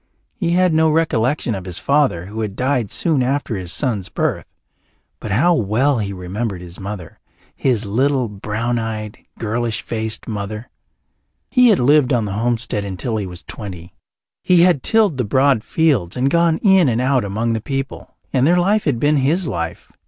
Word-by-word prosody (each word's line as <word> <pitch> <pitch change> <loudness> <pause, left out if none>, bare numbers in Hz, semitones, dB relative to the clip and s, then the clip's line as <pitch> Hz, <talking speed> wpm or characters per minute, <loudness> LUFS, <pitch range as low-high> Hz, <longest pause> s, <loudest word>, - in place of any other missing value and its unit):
He 170 -7 -1
had 180 -1 +3
no 160 0 +4
recollection 150 -5 +1
of 95 -2 -6
his 90 -2 -5
father, 140 - +1
who 105 +4 -6
had 105 -3 -4
died 125 -4 0
soon 155 -6 +1
after 130 -2 -1
his 90 -3 -3
son's 110 -10 -1
birth, - - -2 0.7
but - - -6
how 155 - +3
well 120 - +1
he 100 -2 -3
remembered 95 +2 -4
his 90 -1 -8
mother, 95 -4 -7 0.4
his 120 -5 0
little, 130 +4 +1
brown 110 +4 -3
eyed, 110 -2 -5 0.2
girlish 115 0 -2
faced 110 -1 -3
mother! 110 +1 -5 0.8
He 250 -1 +5
had 215 -5 +5
lived 140 +1 +3
on 115 -3 +1
the 100 - -4
homestead 115 -1 -1
until 100 +4 -3
he 100 -3 -3
was 90 -1 -10
twenty. 90 -5 -9 0.5
He 180 -2 +4
had 175 -7 +3
tilled 215 - +2
the 125 - 0
broad 130 +1 +2
fields 130 - +1
and 135 +2 +1
gone 170 -1 +3
in 190 - +5
and 115 -1 0
out 130 0 +2
among 110 +4 -1
the 110 - -2
people, 135 +2 -5 0.2
and 130 +1 +3
their 175 +2 +4
life 200 +4 +2
had 135 -6 0
been 145 +3 +2
his 155 +7 +1
life. 85 - -4
120 Hz, 180 wpm, -19 LUFS, 105-145 Hz, 0.8 s, He